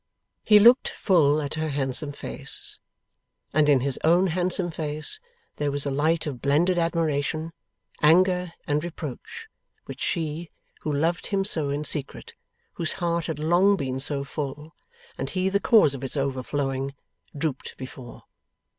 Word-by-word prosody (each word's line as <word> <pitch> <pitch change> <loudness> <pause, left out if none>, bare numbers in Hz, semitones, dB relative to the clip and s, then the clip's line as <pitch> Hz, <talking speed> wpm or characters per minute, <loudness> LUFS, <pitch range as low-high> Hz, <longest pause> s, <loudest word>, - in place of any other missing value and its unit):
He 210 - +7
looked 235 +5 +6
full 155 -7 +3
at 140 - -4
her 155 0 -2
handsome 140 +1 -1
face, - - -7 0.7
and 150 0 +4
in 135 -3 +5
his 135 0 -1
own 175 +4 +4
handsome 180 0 0
face 155 - -1 0.4
there 145 -1 0
was 145 0 -3
a 140 - -1
light 155 +4 +1
of 135 -5 -5
blended 170 +6 +2
admiration, 160 -1 -1 0.5
anger, 180 +3 +4
and 150 +1 0
reproach, 170 - -7 0.4
which - - -9
she 160 0 -2 0.3
who 155 - -2
loved 165 +5 0
him 195 -1 0
so 155 -7 +2
in 145 +2 -2
secret 145 -2 -3 0.4
whose 170 - -2
heart 170 -1 -1
had 160 -3 -3
long 175 +6 +4
been 130 -6 -3
so 140 0 -3
full, 150 +2 -6 0.5
and - - -3
he 185 0 0
the 200 +1 +1
cause 215 - +5
of 135 -1 -7
its 135 +2 -4
overflowing 135 0 -2 0.4
drooped 140 -2 -3
before. 130 -1 -10
155 Hz, 150 wpm, -25 LUFS, 140-175 Hz, 0.7 s, He